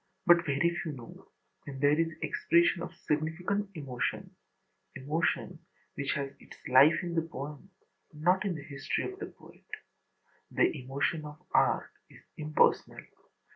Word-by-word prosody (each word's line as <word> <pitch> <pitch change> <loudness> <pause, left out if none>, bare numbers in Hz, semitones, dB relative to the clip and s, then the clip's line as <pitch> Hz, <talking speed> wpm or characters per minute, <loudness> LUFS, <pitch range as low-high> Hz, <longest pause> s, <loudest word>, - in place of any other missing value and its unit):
But 170 -1 +6
very 150 +5 +2
few 155 - -4
know 120 -4 -12 0.4
when 135 -2 -7
there 145 +1 +4
is 165 0 +1
expression 170 +1 +3
of 175 0 -6
significant 175 +7 -1
emotion, 135 -6 -3 0.6
emotion 150 +5 -1 0.3
which 140 0 -2
has 140 -1 -3
its - - -14
life 140 +7 +6
in 175 -1 -3
the 165 - +2
poem 150 +2 -8 0.4
and 150 -1 -12
not 185 +3 +4
in 195 -4 -1
the 145 - -7
history 140 -2 -3
of 380 0 -6
the 400 - -4
poet. - - -17 0.9
The - - +2
emotion 140 +4 -2
of 150 0 -10
art - - +3 0.2
is - - -17
impersonal. 155 0 +1
155 Hz, 145 wpm, -30 LUFS, 140-170 Hz, 0.9 s, But